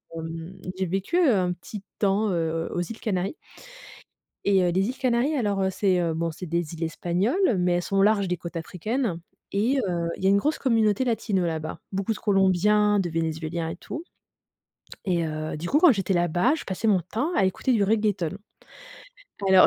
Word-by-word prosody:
hem, 165 +3 -7 0.2
j'ai 190 - 0
vécu 195 - -1
un 200 - +3
petit 195 +3 -9
temps, 205 +1 +2
heu, 165 -1 -1
aux 175 - -1
îles 225 +6 -6
Canaries 195 - -2 1.1
et, 195 -1 +4
heu, 175 - +2
les 190 +3 +1
îles 260 - -5
Canaries, 255 +4 +1
alors, 205 -6 0
heu, 190 - +2
c'est, 185 -2 +1
heu, 165 -2 0
bon, 165 0 -1
c'est 180 +3 -8
des 170 -1 -2
îles 165 0 -4
espagnoles, 190 - +1
mais 180 0 +2
elles 175 - +1
sont 195 - -2
au 195 - +5
large 205 -2 +3
des 180 - -1
côtes 170 0 -8
africaines 190 +4 -2 0.4
et 235 +7 +2
heu, 170 -2 -1
il - - -9
y 190 - +4
a - - +6
une 200 - +5
grosse 300 +10 0
communauté 225 -2 +2
latino 210 -6 0
là-bas. 160 -1 -3
Beaucoup 195 +3 -1
de - - -8
Colombiens, 205 +1 +3
de 185 - 0
Vénézuéliens 160 0 -2
et - - -5
tout. 315 - -7 1.0
Et, 175 -4 +1
heu, 155 0 -4
du 170 +3 -5
coup, 290 - +4
quand 325 -4 +7
j'étais 195 -2 -1
là-bas, 175 - +2
je - - -7
passais 190 +4 -3
mon 195 -3 +4
temps 230 - -2
à 195 - +3
écouter 190 +7 0
du 220 -4 +3
reggaeton. 200 -4 0 1.1
Alors, 190 -1 +8
190 Hz, 200 wpm, -25 LUFS, 170-215 Hz, 1.1 s, Alors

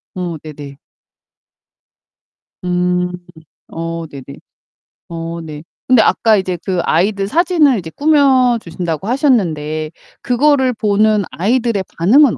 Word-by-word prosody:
어 175 -3 -4
네네. 145 -3 -10 1.9
음. 180 0 0 0.6
어 165 0 -5
네네. 140 -1 -11 0.7
어 165 0 -5
네. 155 -1 -9 0.2
근데 250 -3 +5
아까 220 0 +3
이제 185 -2 -2
그 185 -2 -1
아이들 195 +4 +1
사진을 315 - +3
이제 160 -2 -8
꾸며 275 -5 +3
주신다고 170 0 -5
하셨는데 160 - 0 0.3
그거를 260 0 +2
보는 210 -1 +2
아이들의 225 +1 0
반응은 240 - +4
190 Hz, 225 characters per minute, -16 LUFS, 165-250 Hz, 1.9 s, 근데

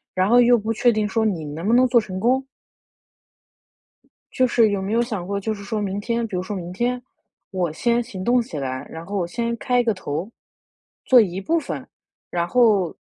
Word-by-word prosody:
然 185 +1 +2
后 245 +1 +6
又 240 0 +5
不 225 +1 -2
确 240 +2 +3
定 215 -2 0
说 220 +2 0
你 175 -8 -1
能 155 +6 -5
不 230 - +3
能 255 +1 +5
做 240 -1 +4
成 185 -3 -6
功。 255 +5 +2 1.9
就 255 - +3
是 230 -3 +3
有 200 -1 -1
没 195 +3 -3
有 235 - +3
想 215 -7 -4
过 200 +1 -2
就 215 +2 -2
是 200 - -10
说 210 +1 -2
明 200 0 -2
天 235 +2 -1
比 200 -5 -5
如 180 - -1
说 205 +2 -5
明 175 -2 -6
天， 245 +5 -1 0.5
我 180 -5 -1
先 235 +8 +1
行 215 -6 -8
动 245 +1 +3
起 230 - -7
来， 130 -1 -4
然 165 +1 -8
后 205 - -4
我 180 -3 0
先 235 +6 -2
开 245 +1 +1
一 - - +1
个 225 - +2
头， 170 +3 -4 0.7
做 255 -2 +7
一 190 -3 0
部 330 +12 +1
分， 310 - -5 0.4
然 170 -1 -1
后， 205 -5 +3
215 Hz, 235 characters per minute, -22 LUFS, 185-240 Hz, 1.9 s, 做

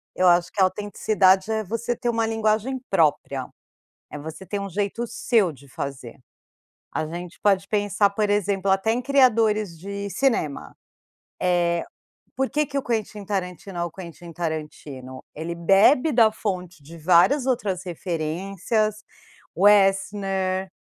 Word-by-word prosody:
Eu 185 - +3
acho 175 0 +4
que 200 - -1
a - - +7
autenticidade 195 0 +2
é 220 0 0
você 230 +4 -2
ter 240 - -5
uma 225 -1 0
linguagem 225 +3 0
própria. 145 -6 +1 0.6
É - - -6
você 160 +5 -8
ter 200 +3 -3
um 200 - -4
jeito 205 +5 -2
seu 230 -4 +1
de 140 -1 -16
fazer. 135 -3 -6 0.7
A 155 - -2
gente 175 +2 -8
pode 195 -1 +2
pensar, 205 -1 +2
por 205 +1 -1
exemplo, 200 -1 0
até 195 +3 +2
em 245 - 0
criadores 225 -9 +3
de 200 +2 -5
cinema. 195 - -1 1.5
Eh, - - -38
porque 280 +3 0
que 280 -1 -4
o 275 - -1
Quentin 215 -3 -3
Tarantino 185 -2 -4
é 170 - 0
o 170 - -4
Quentin 170 -1 -10
Tarantino? 150 -5 -6
Ele 165 +2 -5
bebe 200 - +4
da 230 -3 +5
fonte 180 -7 -5
de 165 +4 -12
várias 180 - +4
outras 205 -8 -1
referências. 185 +5 -2 0.5
Westner, 195 -1 +2
195 Hz, 140 wpm, -24 LUFS, 175-215 Hz, 1.5 s, a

